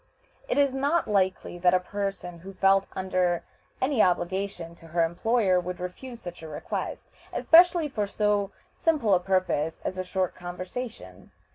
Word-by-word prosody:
It -, -, 0 dB
is 280 Hz, -2 st, +3 dB
not 285 Hz, +5 st, +1 dB
likely 190 Hz, -3 st, 0 dB
that 180 Hz, +1 st, +4 dB
a -, -, +4 dB
person 195 Hz, -2 st, -4 dB
who 195 Hz, +3 st, -10 dB
felt 195 Hz, +1 st, +4 dB
under 185 Hz, -2 st, 0 dB, 0.4 s
any 260 Hz, -3 st, +2 dB
obligation 180 Hz, -1 st, 0 dB
to 165 Hz, -1 st, -15 dB
her 170 Hz, +1 st, +1 dB
employer 190 Hz, +2 st, +2 dB
would 180 Hz, 0 st, -5 dB
refuse 230 Hz, +7 st, -7 dB
such 175 Hz, -1 st, -8 dB
a 160 Hz, -, -8 dB
request, 150 Hz, -, -4 dB, 0.3 s
especially 340 Hz, -1 st, +5 dB
for 215 Hz, -7 st, -2 dB
so 205 Hz, -1 st, +1 dB, 0.2 s
simple 295 Hz, -11 st, +2 dB
a 180 Hz, -, +5 dB
purpose 180 Hz, -4 st, 0 dB
as 185 Hz, -, -3 dB
a -, -, -1 dB
short 185 Hz, 0 st, -1 dB
conversation. 180 Hz, -, -7 dB
190 Hz, 155 wpm, -27 LUFS, 175-220 Hz, 0.4 s, especially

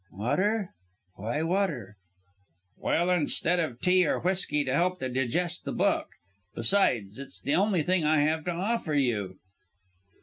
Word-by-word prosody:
"Water! 190 Hz, -, 0 dB, 0.4 s
Why 120 Hz, +10 st, -2 dB
water?" 165 Hz, -, -1 dB, 0.8 s
"Well, 175 Hz, +2 st, 0 dB
instead 175 Hz, +1 st, +1 dB
of 130 Hz, -8 st, -2 dB
tea 180 Hz, -1 st, +4 dB
or -, -, 0 dB
whisky 180 Hz, -5 st, 0 dB
to 130 Hz, -2 st, -2 dB
help 180 Hz, +4 st, +1 dB
digest 135 Hz, +7 st, -1 dB
the -, -, -4 dB
book. -, -, +1 dB, 0.5 s
Besides, 115 Hz, -, +1 dB
it's 140 Hz, -, -9 dB
the 140 Hz, -, -1 dB
only 190 Hz, -4 st, +2 dB
thing 180 Hz, +1 st, +1 dB
I 155 Hz, 0 st, +3 dB
have 155 Hz, +1 st, +1 dB
to 180 Hz, -, -1 dB
offer 180 Hz, -2 st, -1 dB
you." 105 Hz, -9 st, 0 dB
160 Hz, 140 wpm, -28 LUFS, 130-180 Hz, 0.8 s, tea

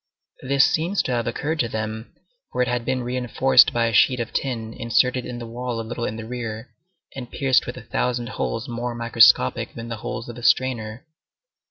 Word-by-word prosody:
This 135 Hz, +1 st, +3 dB
seems 175 Hz, +5 st, 0 dB
to -, -, -3 dB
have 120 Hz, -2 st, -1 dB
occurred 150 Hz, +7 st, -2 dB
to 120 Hz, -, +1 dB
them, 110 Hz, +1 st, -5 dB, 0.4 s
for 125 Hz, -, +1 dB
it -, -, -2 dB
had 120 Hz, -1 st, -2 dB
been 130 Hz, 0 st, -1 dB
re 125 Hz, +1 st, -3 dB
enforced 125 Hz, +1 st, +4 dB
by 115 Hz, -1 st, +1 dB
a 115 Hz, -, -1 dB
sheet 125 Hz, +4 st, +4 dB
of 120 Hz, -1 st, -4 dB
tin 115 Hz, -4 st, -3 dB
inserted 125 Hz, +2 st, +1 dB
in 125 Hz, -1 st, -6 dB
the 120 Hz, -, -6 dB
wall 120 Hz, 0 st, -4 dB
a 115 Hz, -, -4 dB
little 120 Hz, 0 st, -3 dB
in 110 Hz, -, -3 dB
the 110 Hz, 0 st, -7 dB
rear, 115 Hz, -1 st, -6 dB, 0.4 s
and 125 Hz, -3 st, -7 dB
pierced 135 Hz, -3 st, +2 dB
with -, -, -6 dB
a -, -, -9 dB
thousand 120 Hz, -1 st, -2 dB
holes 115 Hz, +4 st, -3 dB
more 120 Hz, 0 st, -4 dB
microscopic 115 Hz, -, +4 dB
than 115 Hz, 0 st, -7 dB
the 115 Hz, -, -4 dB
holes 110 Hz, +2 st, -5 dB
of 120 Hz, 0 st, -8 dB
a -, -, -10 dB
strainer. 120 Hz, 0 st, +1 dB
120 Hz, 210 wpm, -23 LUFS, 115-125 Hz, 0.4 s, enforced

